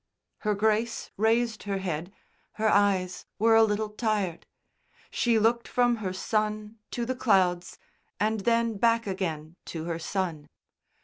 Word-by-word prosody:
'" - - -58
Her 210 -1 0
Grace 220 +3 0
raised 225 +1 +1
her 195 - 0
head. 175 -2 -4 0.4
Her 220 0 0
eyes 195 -3 +1
were 225 +2 +4
a 225 - +7
little 215 0 +1
tired. 210 -5 -2 0.6
She 235 -2 +2
looked 230 +2 +2
from 245 -1 +2
her 195 -4 -3
son 215 +2 -2
to 240 - -3
the 255 - -1
clouds, 185 -8 +1 0.4
and 215 +2 +1
then 230 +1 +1
back 230 +2 +2
again 170 -4 -4
to 160 -2 -5
her 170 -1 -3
son. 165 -4 -3
210 Hz, 145 wpm, -27 LUFS, 185-225 Hz, 0.6 s, a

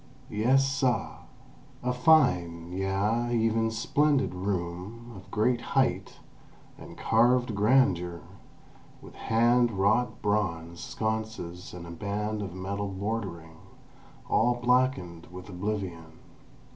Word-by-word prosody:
Yes, 130 +6 +3
suh!" 135 -4 0 0.7
A 125 0 0
fine—yea, 95 - +2
even 115 0 +2
a - - -2
splendid 135 +2 +1
room, 95 +5 -4
of 95 0 -13
great 120 +3 +1 0.2
height, - - +1 0.6
and - - -12
carved 120 +1 +3
grandeur, 95 - +2 0.8
with - - -13
hand 120 +2 +3
wrought 110 +4 +1
bronze 85 -5 -1
sconces 110 -5 -4
and 90 -1 -9
a 85 - -8
band 105 +4 -3
of 95 -3 -6
metal 100 +2 -3
bordering, 95 -5 -4 0.7
all 120 +2 +3
blackened 120 -9 0
with 90 +1 -10
oblivion. 90 -4 -4
105 Hz, 105 wpm, -28 LUFS, 90-120 Hz, 0.8 s, Yes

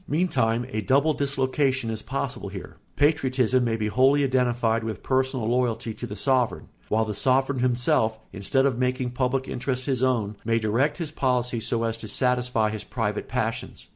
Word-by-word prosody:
Meantime 120 -8 +1
a 110 -3 -2
double 140 +6 +3
dislocation 135 -3 0
is 110 -1 -4
possible 130 -3 -4
here: 95 -2 -9 0.2
patriotism 130 -4 +2
may 115 -2 0
be 110 - -2
wholly 130 +6 +3
identified 120 -4 +1
with 110 -1 -5
personal 130 -3 0
loyalty 120 -2 0
to 120 - -7
the 105 - -6
sovereign, 130 +2 0 0.2
while 110 +1 +2
the 105 - -3
sovereign 130 +4 +1
himself, 120 -3 +2 0.2
instead 135 +8 +1
of 130 -3 0
making 125 0 0
public 130 +1 -1
interests 125 0 -3
his 130 -3 0
own, 115 -5 +1
may 115 0 +1
direct 115 +7 +1
his 165 -4 -4
policy 125 -4 0
so 115 +1 -1
as 115 0 -2
to 110 - -7
satisfy 125 -1 +1
his 110 -1 -5
private 105 -3 -3
passions. 115 -2 -4
125 Hz, 170 wpm, -25 LUFS, 115-130 Hz, 0.2 s, double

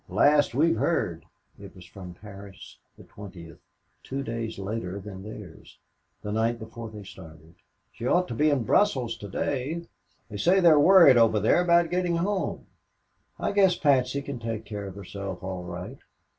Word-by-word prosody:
"Last 145 -4 +3
we've 150 -3 +3
heard." 90 - -1 0.3
It 100 -1 -12
was 90 -1 -13
from 90 -1 -11
Paris, 100 -1 -12 0.2
the - - -14
20th, 90 -5 -12 0.4
two 135 +1 -5
days 115 -2 -5
later 100 -1 -4
than 95 -1 -9
theirs, 105 -5 -11 0.5
the 105 - -4
night 115 +2 0
before 110 0 -9
they 105 -1 -10
started. 80 -4 -14 0.4
"She 115 - -6
ought 180 +6 +2
to - - -3
be 150 +6 +2
in 140 -5 +1
Brussels 130 - +1
to 100 - -9
day. 145 - -3 0.4
They 105 - -8
say 180 - +3
they're 165 -5 +6
worried 170 -5 +7
over 115 -2 +4
there 110 - +3
about 170 -1 +3
getting 180 -1 0
home. 190 +3 -2 0.7
I - - -1
guess 195 -3 +4
Patsy 140 -1 +1
can 140 -3 -6
take 115 -1 -5
care 100 -1 -6
of 95 - -9
herself 100 -1 -7
all 95 -1 -5
right. 90 +9 -8
115 Hz, 170 wpm, -26 LUFS, 100-145 Hz, 0.7 s, worried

